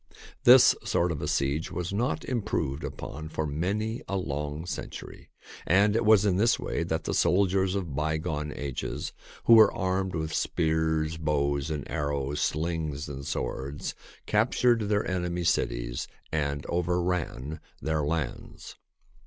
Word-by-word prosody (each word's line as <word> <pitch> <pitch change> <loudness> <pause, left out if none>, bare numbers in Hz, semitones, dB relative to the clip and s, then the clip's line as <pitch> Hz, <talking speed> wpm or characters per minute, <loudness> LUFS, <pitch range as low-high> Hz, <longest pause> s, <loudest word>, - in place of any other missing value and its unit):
This - - +9
sort 85 0 +1
of 75 - -3
siege 70 +4 0
was 90 +1 -3
not 125 +9 -1
im 125 -3 0
proved 80 -9 -2
upon 80 +2 -6
for 80 0 -2
many 100 - -2
a 100 - -1
long 75 -2 -3
century, 90 - -7 0.3
and 100 +4 +4
it 115 - +2
was 105 -2 +6
in 95 -3 +2
this 115 +4 +4
way - - -3
that 80 -1 -1
the - - -2
soldiers 95 0 +2
of 85 -8 -3
by 75 +2 0
gone 75 -2 -3
ages, 70 -3 -4 0.3
who 115 - +6
were 110 -2 +8
armed 95 -1 -1
with 80 -1 -2
spears, 80 -1 0
bows 70 -2 0
and 75 -3 -3
arrows, 70 0 -2
slings, 80 -2 -1
and 70 -1 -7
swords, 70 +2 -3 0.3
captured 115 0 +2
their 105 -1 +1
enemies' 90 -2 0
cities - - -2 0.2
and 70 -2 -1
over 90 0 0
ran 80 -5 -2 0.2
their 80 -1 0
lands. 75 +2 -4
80 Hz, 145 wpm, -28 LUFS, 75-95 Hz, 0.3 s, This